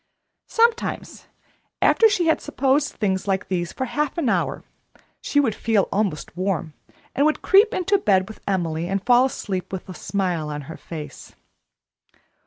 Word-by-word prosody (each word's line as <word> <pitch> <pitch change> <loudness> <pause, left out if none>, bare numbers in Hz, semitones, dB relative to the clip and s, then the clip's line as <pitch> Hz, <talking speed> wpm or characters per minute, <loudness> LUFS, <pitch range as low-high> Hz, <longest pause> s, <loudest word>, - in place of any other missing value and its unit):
Sometimes, 460 0 0 0.5
after 450 - +5
she 365 -4 +1
had 320 - +2
supposed 280 0 0
things 190 -2 -1
like 190 -1 -1
these 175 -2 -2
for 260 - -3
half 295 +5 -2
an 300 -8 +1
hour, - - -1 0.6
she 290 - +1
would 250 -7 +2
feel 215 -2 +1
almost 195 -7 -2
warm, 180 -4 -2 0.4
and 280 - +1
would 310 +1 +1
creep 410 +3 +5
into 390 -2 +1
bed 190 - +2
with 220 - -11
Emily 170 -4 -1
and 195 +1 -2
fall 245 +1 +5
asleep 195 -8 -4
with 190 -2 -6
a 185 - -7
smile 180 -6 -2
on 150 0 -4
her 160 +3 -9
face. 150 -4 -9
200 Hz, 160 wpm, -23 LUFS, 180-290 Hz, 0.6 s, after